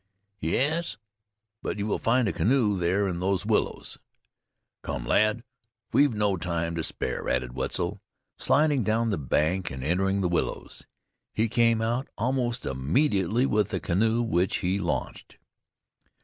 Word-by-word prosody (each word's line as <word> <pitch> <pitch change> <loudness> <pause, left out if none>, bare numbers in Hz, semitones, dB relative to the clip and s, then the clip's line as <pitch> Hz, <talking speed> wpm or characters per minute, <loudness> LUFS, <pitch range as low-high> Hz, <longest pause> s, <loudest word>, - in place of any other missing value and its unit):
"Yes; 150 - 0 0.6
but - - -3
you 100 - -2
will 105 - -1
find 120 +1 +2
a 95 - 0
canoe 115 -2 +2
there 95 +3 +1
in 85 -2 -3
those 95 0 0
willows." - - -1 0.8
"Come, - - -4
lad, 110 +2 +2 0.5
we've 140 -5 +4
no 105 -2 +1
time 85 -1 -2
to 85 -1 -2
spare," - - -3
added 65 -1 -1
Wetzel, 85 +9 -2 0.4
sliding 145 -3 +3
down 110 +2 +1
the 95 - -1
bank 80 +7 0
and 65 -1 -6
entering 95 +6 +1
the 90 - +1
willows. 85 -1 -3 0.5
He 110 +2 +2
came 115 0 +2
out 120 +4 -1
almost 120 +1 -1
immediately 95 - +1
with 105 -5 +1
the - - -2
canoe 110 +6 +1
which 95 -5 +1
he 95 +3 +1
launched. 85 - -4
100 Hz, 145 wpm, -27 LUFS, 85-115 Hz, 0.8 s, we've